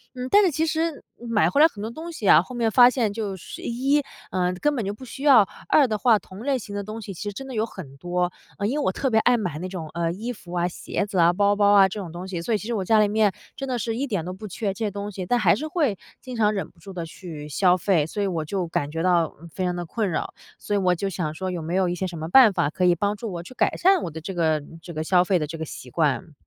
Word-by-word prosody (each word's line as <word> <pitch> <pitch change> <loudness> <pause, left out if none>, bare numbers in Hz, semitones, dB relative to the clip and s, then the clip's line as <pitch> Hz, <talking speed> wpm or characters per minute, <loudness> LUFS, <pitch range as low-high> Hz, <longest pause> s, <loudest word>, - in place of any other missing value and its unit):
嗯， 250 0 -4
但 410 0 +6
是 360 - +3
其 315 +3 0
实 320 0 -1 0.2
买 230 -3 +1
回 285 - +3
来 320 - +9
很 205 -10 -10
多 220 - -3
东 325 +7 -7
西 230 -11 -4
啊， 155 - +8
后 245 +8 -9
面 230 -2 +1
发 245 +1 +8
现 235 -5 0
就 205 -3 -3
是 - - -9
一， 270 +5 +1 0.3
嗯， 180 -1 0
根 295 0 +2
本 240 - -1
就 200 - -2
不 260 +5 -11
需 270 +3 -9
要， 245 -9 +7 0.2
二 285 -4 +5
的 215 - -1
话， 225 0 +4
同 190 0 -13
类 275 -1 +1
型 205 -4 -8
的 200 - -3
东 215 +2 -7
西 195 - -7
其 175 - -10
实 205 - -4
真 270 +6 -7
的 260 - -7
有 220 0 0
很 145 -11 -10
多。 180 +3 -1 0.3
嗯， 200 -1 -1
因 285 +6 -1
为 - - -1
我 - - +2
特 265 +7 -1
别 220 - +4
爱 245 +2 +4
买 175 -8 -3
那 185 - -4
种， 175 -4 -6
呃， 170 -1 -1
衣 225 +8 -4
服 180 -5 -12
啊、 175 0 +1
鞋 190 +3 -3
子 200 -3 -2
啊、 170 +1 +5
包 200 +2 +3
包 205 0 +4
啊 195 -1 +7
这 210 - -6
种 180 -5 -6
东 175 +3 -7
西， 180 -3 -4
所 225 - -1
以 - - +3
其 210 - -8
实 240 - -2
我 200 - -1
家 220 +3 +4
里 210 - +4
面 210 -1 +2 0.2
真 270 - -5
的 255 - -1
是 225 0 -2
一 275 +4 -2
点 200 -9 -2
都 180 - -4
不 210 +3 -8
缺 200 0 -3
这 225 - -5
些 - - 0
东 200 +1 -5
西， 190 -2 -5
但 245 +7 +2
还 185 -6 +4
是 305 +9 -4
会 295 - 0 0.2
经 255 -2 -7
常 215 -2 +2
忍 195 - -3
不 170 - -26
住 195 - -11
地 170 -2 -4
去 160 -3 -9
消 180 +4 +3
费， 175 -4 +2
所 205 +6 -4
以 - - +1
我 165 -4 -2
就 185 +1 -2
感 145 -3 -2
觉 165 +1 -3
到 175 -3 +2 0.2
非 190 - -3
常 180 -1 0
地 175 0 -4
困 210 +3 -2
扰。 155 - -3 0.3
所 205 - -4
以 200 - +2
我 180 -2 +2
就 195 +3 -2
想 165 -4 -3
说 185 +3 -4
有 175 - -4
没 165 +3 -3
有 190 -1 +2
一 175 - -1
些 190 +2 -2
什 175 -2 -7
么 160 0 -4
办 245 -1 +8
法 145 - +1
可 180 +4 0
以 175 -1 +5
帮 205 +4 0
助 220 -1 -6
我 170 -1 -5
去 255 - -12
改 - - +1
善 380 +1 +4
我 - - -3
的 160 +1 -7
这 190 +4 -5
个 160 -3 +1 0.2
这 170 0 -9
个 155 - -3
消 180 +2 +4
费 185 -1 +2
的 150 - -1
这 165 +2 -6
个 160 - -4
习 125 - -9
惯。 155 +3 0
200 Hz, 335 characters per minute, -24 LUFS, 175-230 Hz, 0.3 s, 来